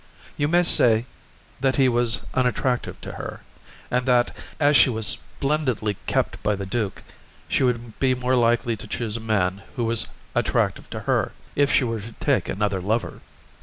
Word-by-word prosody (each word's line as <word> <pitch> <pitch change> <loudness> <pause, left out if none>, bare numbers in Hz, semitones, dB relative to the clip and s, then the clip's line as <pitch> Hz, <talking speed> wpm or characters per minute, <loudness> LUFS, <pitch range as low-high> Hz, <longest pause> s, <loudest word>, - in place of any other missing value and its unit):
You 145 - 0
may 175 +3 +4
say 115 -8 +5 0.5
that 135 0 +1
he 135 -2 +4
was 120 -3 +2
unattractive 130 0 0
to - - -7
her, - - -7 0.5
and 125 +1 0
that, 125 -1 +3 0.2
as 145 -1 +4
she 135 - +7
was 110 -2 -2
splendidly 130 -6 0
kept - - 0
by 105 - +1
the 100 0 -5
duke, 105 0 -3 0.4
she - - 0
would 120 -3 -1
be 130 -1 +2
more 125 +1 0
likely 120 -1 +2
to 110 - -10
choose 115 -3 -3
a - - -3
man 100 -4 0
who 120 - -1
was 115 -1 +1 0.3
attractive - - 0
to - - -6
her, - - 0 0.2
if 145 0 +3
she - - +4
were 115 -3 -2
to 110 +3 -10
take - - 0
another 100 -1 -1
lover. 110 +5 -2
120 Hz, 175 wpm, -24 LUFS, 110-130 Hz, 0.5 s, she